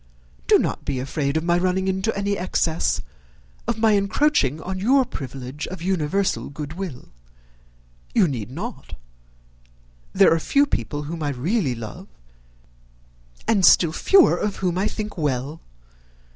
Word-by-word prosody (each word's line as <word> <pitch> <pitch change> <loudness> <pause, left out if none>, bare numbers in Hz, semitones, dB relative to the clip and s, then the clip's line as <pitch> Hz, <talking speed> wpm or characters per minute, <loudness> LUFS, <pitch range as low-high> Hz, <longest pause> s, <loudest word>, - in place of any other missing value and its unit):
Do - - +7
not - - -2
be 130 - -2
afraid 140 +2 -1
of 160 - -1
my 175 0 +2
running 185 +1 0
into 190 +3 0
any 200 0 0
excess, 170 -3 0 0.6
of 235 - 0
my 220 0 +3
encroaching 200 - +2
on 185 +3 -5
your 260 +6 +3
privilege 135 - -6
of 185 -2 -7
universal 190 +1 0
good 145 +1 -7
will. 175 -7 -7 1.1
You - - +5
need 120 -7 -4
not. 200 - -7 1.2
There - - +5
are 165 - +1
few 280 - +3
people 145 - -3
whom 160 +2 -6
I 145 - -1
really 140 - -1
love, 115 -2 -8 1.4
and 205 -4 +2
still 170 -2 +6
fewer 385 - +5
of 210 -2 -2
whom 180 -2 -1
I 190 +3 0
think 210 -4 -5
well. 145 +1 -2
175 Hz, 145 wpm, -23 LUFS, 145-200 Hz, 1.4 s, Do